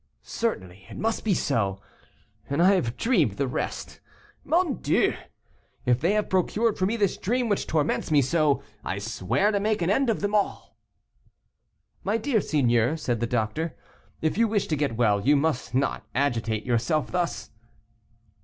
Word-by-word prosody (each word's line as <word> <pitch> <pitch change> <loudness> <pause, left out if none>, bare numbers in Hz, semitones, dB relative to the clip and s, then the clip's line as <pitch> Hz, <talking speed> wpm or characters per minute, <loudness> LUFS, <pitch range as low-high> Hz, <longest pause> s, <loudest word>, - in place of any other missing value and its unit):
Certainly, 95 - -4
it - - -9
must 225 +1 -1
be 205 -4 +2
so, 100 -11 0 0.7
and 140 +2 -1
I 185 +3 +6
have 125 -11 -1
dreamed 180 - +2
the 140 +7 -1
rest. 125 - -4 0.4
Mon 340 -3 +1
Dieu! - - +2 0.7
if 125 0 +2
they 175 +6 +2
have 210 0 0
procured 205 +4 +1
for 185 - +2
me 220 - -1
this 200 -4 +1
dream 240 +4 0
which 205 - 0
torments 155 -1 0
me 150 -2 +4
so, 145 +1 +2 0.2
I 95 - -3
swear 115 - 0
to 205 - +1
make 215 +1 0
an 175 - +1
end 265 +4 +2
of 225 - 0
them 205 0 -1
all." 205 -1 -1 1.3
"My 205 +3 +1
dear 230 -2 +1
seigneur," 125 -2 +2
said 120 -7 -2
the 120 - -1
doctor, 120 +8 -2 0.5
"if 160 +7 0
you 230 - +4
wish 210 -2 0
to 155 - +1
get 140 -6 -1
well, 105 -4 +3
you 145 +7 +4
must 140 -5 -1
not 135 +1 0
agitate 115 -5 0
yourself 125 +4 0
thus." 175 -1 -2
155 Hz, 170 wpm, -26 LUFS, -, 1.3 s, I